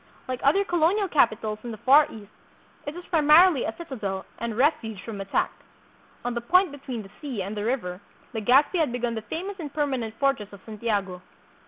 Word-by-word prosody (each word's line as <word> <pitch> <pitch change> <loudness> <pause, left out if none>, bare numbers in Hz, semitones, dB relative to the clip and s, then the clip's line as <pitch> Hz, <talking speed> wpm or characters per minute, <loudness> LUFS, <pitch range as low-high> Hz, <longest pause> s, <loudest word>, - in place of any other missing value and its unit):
Like 255 -1 -4
other 355 +9 +4
colonial 350 +4 +2
capitals 220 - +1
in 240 - -6
the 220 - -6
Far 280 +7 +6
East, 210 -2 -11 0.6
it 290 - -4
was 355 0 -9
primarily 315 -1 +6
a 220 - -3
citadel 215 - -5
and 230 -2 -3
refuge 250 - +1
from 210 -4 -6
attack. 195 - 0 0.7
On 245 - -1
the 235 - -2
point 365 +8 +4
between 265 -5 -6
the 195 - -14
sea 255 -10 -3
and 200 +3 -5
the 205 - -3
river 205 -6 -2 0.3
Legazpi 260 - +3
had 310 -6 +2
begun 240 -1 -2
the 220 - -4
famous 360 - -5
and 300 -4 -6
permanent 265 -7 -2
fortress 270 -7 0
of 200 - -12
Santiago. 205 -4 -2
245 Hz, 185 wpm, -26 LUFS, 215-300 Hz, 0.7 s, Far